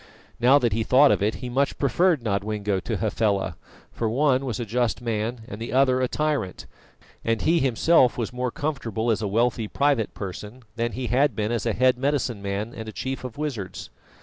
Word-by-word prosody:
Now 125 +4 +6
that 120 -6 +1
he 115 - 0
thought 135 +5 +5
of - - +1
it, 105 +2 +1
he 125 - -6
much 135 +3 0
preferred 150 +1 +2
Nodwengo 105 -1 -1
to - - -3
Hafela, 100 -3 0 0.4
for 115 - -3
the - - +1
one 135 -1 +2
was 125 -2 -3
a 120 - -2
just 120 +1 0
man 115 0 -2
and 105 +3 -8
the 115 - -4
other 130 -1 +3
a 130 - +2
tyrant; 150 -10 -2 0.6
and 115 -1 0
he 165 +1 +3
himself 130 +1 +3
was 120 0 -3
more 125 0 -1
comfortable 120 -6 -2
as 110 - 0
a 105 - -1
wealthy 115 +1 +1
private 140 -3 0
person 105 +5 -7
than 120 0 -2
he 130 +1 -4
had 130 +1 +2
been 105 +1 -1
as 120 -1 -1
a 115 - +1
head 125 +2 +3
medicine 130 -6 -1
man 100 +3 -3
and 110 -1 -7
a - - -6
chief 130 +4 -4
of 125 -1 -7
wizards. 135 -11 -5
120 Hz, 205 wpm, -24 LUFS, 110-135 Hz, 0.6 s, Now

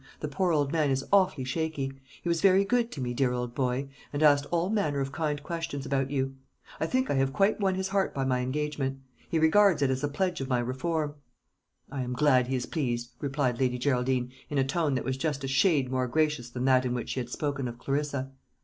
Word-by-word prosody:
The 150 - -3
poor 170 +5 0
old 145 -3 +1
man 155 -3 +2
is 135 0 0
awfully 185 -8 +4
shaky. 140 0 -2 0.3
He - - -4
was 170 -1 +1
very 195 0 +5
good 240 +2 +1
to 140 - -5
me, 120 -1 -2
dear 125 0 +1
old 125 -1 -3
boy, 130 +1 -1 0.2
and 145 +1 -1
asked 145 -1 +5
all 175 +3 0
manner 175 -10 0
of 135 0 -2
kind 150 -1 -2
questions 165 -4 -4
about 135 -1 0
you. 135 -1 -1 0.5
I 160 - 0
think 260 +5 0
I - - +2
have 135 0 +2
quite 200 +8 +2
won 190 -2 +1
his 190 0 -2
heart 195 -1 +1
by 135 -1 -2
my 130 -1 +1
engagement; 135 +1 -2 0.3
he 165 - +1
regards 160 0 +5
it 135 - +2
as 130 +2 -2
a - - +2
pledge 175 +3 -1
of 135 - -4
my 125 - +2
reform." 145 +5 -1 0.8
"I 135 -2 -3
am 125 0 -3
glad 130 -2 +3
he 130 - -1
is 125 - -2
pleased," 120 -6 -2
replied 135 -4 -1
Lady 125 -2 +1
Geraldine, 125 -1 0 0.2
in 145 - -2
a 135 - +4
tone 145 +1 0
that 130 - -2
was 130 0 -1
just 145 -1 -2
a - - -2
shade 140 -2 +2
more 130 -1 0
gracious 150 -2 0
than 125 +1 -3
that 130 -1 +5
in 125 -1 -1
which 120 - -4
she - - -2
had 120 -1 -4
spoken 140 -1 -2
of 120 0 -7
Clarissa. 140 0 -2
140 Hz, 235 wpm, -28 LUFS, 130-160 Hz, 0.8 s, very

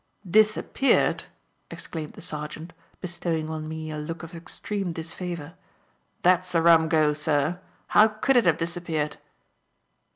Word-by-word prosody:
"Disappeared!" 215 +7 +3 0.4
exclaimed 155 -3 -6
the - - -11
sergeant, 150 +2 -6 0.3
bestowing 170 -3 -2
on 155 -1 -4
me 160 0 -5
a 155 - -4
look 165 +2 -6
of 165 +2 -9
extreme 180 +2 -4
disfavour; 165 -1 -6 0.7
"that's 180 0 +3
a 165 - +4
rum 165 -1 +6
go, 155 -2 +3
sir. 150 +2 0 0.3
How 215 - +7
could 220 +5 0
it 240 -6 +5
have 165 -2 +4
disappeared?" 165 -3 -2
165 Hz, 130 wpm, -26 LUFS, 155-180 Hz, 0.7 s, How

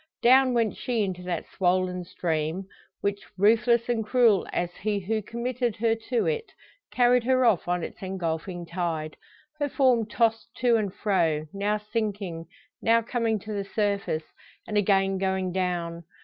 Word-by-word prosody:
Down 255 +1 +6
went 230 -3 +1
she 235 -4 -1
into 185 -2 -3
that 180 -2 -3
swollen 180 0 +1
stream, 165 +2 -2 0.4
which, 200 0 -1 0.2
ruthless 230 +4 +4
and 235 -2 0
cruel 225 -3 +3
as 175 0 -2
he 210 -1 -1
who 215 +3 -1
committed 235 +1 -2
her 225 +1 +2 0.2
to 245 -3 +1
it, 465 -1 -2 0.4
carried 245 -1 +4
her 255 0 +3
off 215 -8 +3
on 175 -1 0
its - - -7
engulfing 175 -2 -3
tide 165 -3 -3 0.4
her 290 -1 0
form 250 -5 +3
tossed 225 0 0
to 245 -2 +3
and 210 -4 0
fro, 170 -7 0
now 205 +2 0
sinking, 205 -6 -3 0.3
now 230 0 +3
coming 230 -2 0
to 215 - -6
the 200 -1 -2
surface, 200 -6 0 0.4
and 210 - -4
again 195 -1 +2
going 190 -1 0
down. 175 -2 -2
205 Hz, 155 wpm, -26 LUFS, 180-230 Hz, 0.4 s, Down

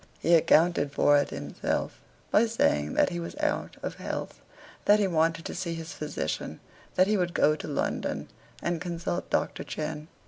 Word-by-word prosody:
He 170 - +2
accounted 165 -2 +4
for 145 +1 +4
it 145 - -1
himself, - - -3 0.3
by 230 +2 +5
saying 75 - +1
that - - +4
he 175 - -3
was 170 - -6
out 300 -1 -1
of - - -4
health; - - -5 0.4
that 205 - +6
he 205 - +3
wanted 165 -2 +1
to - - -4
see 175 -2 -3
his 165 0 -7
physician; 150 - -4 0.4
that 185 - +5
he 210 +2 +2
would 175 -2 -1
go 150 - +4
to 155 - -7
London, 145 - -2 0.4
and 170 -1 -1
consult 175 0 -3
Doctor - - 0
Cheyne. 155 0 -5
165 Hz, 175 wpm, -28 LUFS, 155-180 Hz, 0.4 s, that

